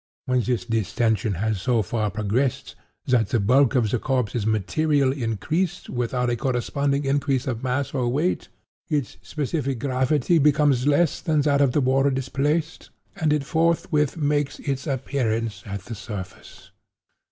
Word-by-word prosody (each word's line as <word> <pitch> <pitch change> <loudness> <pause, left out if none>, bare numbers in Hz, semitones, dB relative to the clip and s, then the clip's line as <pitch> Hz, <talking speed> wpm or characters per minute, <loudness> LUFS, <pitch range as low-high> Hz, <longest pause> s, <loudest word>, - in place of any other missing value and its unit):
When 125 -1 +2
this 120 0 -1
distension 110 -2 0
has 105 +1 -1
so 120 -4 +2
far 105 +2 -1
progressed 110 +6 -1 0.3
that 120 -5 +2
the 115 - +1
bulk 130 +6 +3
of 115 -5 +2
the 125 - +1
corpse 125 -4 -1
is 110 -3 -1
materially 135 - +1
increased 155 - -2
without 125 0 -1
a - - +1
corresponding 140 +3 -1
increase 135 -1 0
of 120 -3 -3
mass 130 +2 -1
or 125 -3 0
weight, 150 +9 0 0.4
its 145 -8 -2
specific 140 -3 -2
gravity 135 +5 +1
becomes 145 -3 +3
less 150 +2 +2
than 155 -3 +1
that 145 -1 +2
of 135 -3 +3
the 150 - +2
water 135 +2 +3
displaced, 140 +4 -1 0.3
and 155 -1 0
it 150 -2 +1
forthwith 160 -1 +1
makes 145 -1 0
its 140 +1 -3
appearance 120 -5 -1
at 100 -1 -5
the 115 - -7
surface. 100 -4 -9
130 Hz, 150 wpm, -24 LUFS, 115-145 Hz, 0.4 s, bulk